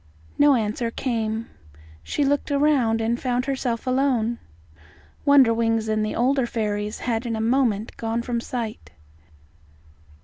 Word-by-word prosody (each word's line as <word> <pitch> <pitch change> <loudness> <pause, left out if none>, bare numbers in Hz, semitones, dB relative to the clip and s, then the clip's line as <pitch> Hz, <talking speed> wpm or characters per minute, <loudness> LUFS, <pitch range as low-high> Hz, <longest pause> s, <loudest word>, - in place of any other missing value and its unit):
No 290 -1 +6
answer 230 +1 -1
came. 225 -2 -2 0.5
She 290 - -1
looked 285 +2 0
around, 280 -6 +2
and 230 +2 0
found 250 -1 -1
herself 255 -4 -2
alone. 255 -3 +1 0.9
Wonderwings 230 -5 +4
and 215 0 0
the 215 - -2
older 260 +1 +2
fairies 210 -2 -2
had 235 0 -2
in 230 - -2
a - - -3
moment 225 -2 +1
gone 230 +1 -2
from 235 -1 -2
sight. 230 -3 -5
235 Hz, 130 wpm, -23 LUFS, 225-260 Hz, 0.9 s, No